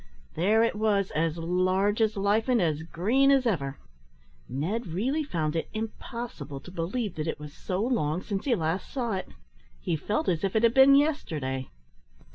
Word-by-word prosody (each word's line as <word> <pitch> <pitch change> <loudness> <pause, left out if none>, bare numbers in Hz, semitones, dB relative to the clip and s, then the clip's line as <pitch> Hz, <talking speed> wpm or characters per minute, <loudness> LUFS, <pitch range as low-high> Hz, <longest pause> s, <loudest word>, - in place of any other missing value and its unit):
There 210 +7 +3
it 230 - +2
was, 210 -2 +1
as 165 +1 0
large 185 +5 +1
as 215 -1 +2
life, 205 +4 +1
and 245 -2 +4
as 160 -4 +1
green 215 +12 +2
as 270 -2 +4
ever. 140 - -1 0.7
Ned 180 - -2
really 245 - -1
found 160 - -2
it 165 - -2
impossible 220 - -6
to 180 - -11
believe 185 +5 -2
that 155 +1 -2
it 160 - -3
was 150 -1 -9
so 185 +2 -3
long 185 - 0
since 200 -2 -3
he 255 -4 +3
last 165 0 -2
saw 240 -5 -2
it. 185 -1 -4 0.5
He 160 - -1
felt 210 - -1
as 170 0 0
if 195 +1 -1
it 220 - +3
had 230 0 +5
been 270 +1 +7
yesterday. 155 - 0
195 Hz, 180 wpm, -27 LUFS, 165-230 Hz, 0.7 s, been